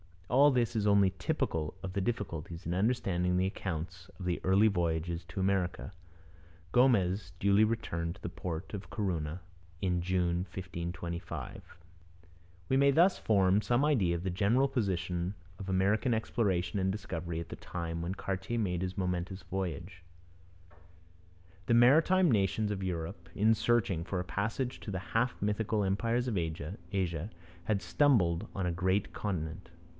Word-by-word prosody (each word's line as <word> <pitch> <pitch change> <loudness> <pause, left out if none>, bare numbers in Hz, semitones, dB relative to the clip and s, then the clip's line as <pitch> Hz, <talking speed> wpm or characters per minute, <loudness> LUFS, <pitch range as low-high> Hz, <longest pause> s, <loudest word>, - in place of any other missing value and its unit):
All 140 +4 +7
this 125 -3 +1
is 105 -2 +1
only 100 -2 +4
typical 75 -1 -1
of 95 -1 -4
the 100 - 0
difficulties 90 -6 -4
in 85 - -1
understanding 90 -4 +1
the 90 - +2
accounts 90 -1 -4
of 95 - -7
the 90 -1 0
early 95 +4 +5
voyages 85 -3 -1
to 95 - -5
America. 95 -1 0 0.8
Gomez 100 -7 +3
duly 100 +3 +4
returned 85 -7 -2
to - - -18
the - - -4
port 85 0 -5
of 100 -1 -6
Corunna 90 -5 -2 0.4
in 90 -2 0
June 90 -1 +1
1525. 85 -2 -5 1.1
We 130 - +2
may 140 +1 +5
thus 170 +7 +4
form 100 -1 +3
some 120 +5 +2
idea 100 - +2
of 85 - -4
the 95 - -1
general 110 +9 +3
position 90 -5 -1 0.2
of 95 -1 -6
American 100 +6 +2
exploration 100 -5 0
and 95 0 +1
discovery 85 -4 -4
at 85 -1 -6
the - - -7
time 85 -1 -4
when 90 +3 -3
Cartier 95 +5 -3
made 90 -6 0
his 95 +2 -3
momentous 90 0 -2
voyages. 90 0 -4 1.7
The 115 - +4
maritime 160 +8 +5
nations 105 0 +1
of 100 -2 -3
Europe, 85 -3 -4
in 110 +2 +4
searching 105 -6 +1
for 95 +1 -3
a - - -1
passage 115 +7 -2
to 105 - -6
the 95 - -2
half 125 +2 +1
mythical 105 +1 0
empires 115 +6 0
of 110 -5 -1
Asia, 85 +2 -3 0.4
had 100 -1 +1
stumbled 95 - +3
on 95 - -1
a 90 - +1
great 95 +3 0
continent. 80 -6 -4
95 Hz, 150 wpm, -31 LUFS, 85-110 Hz, 1.7 s, All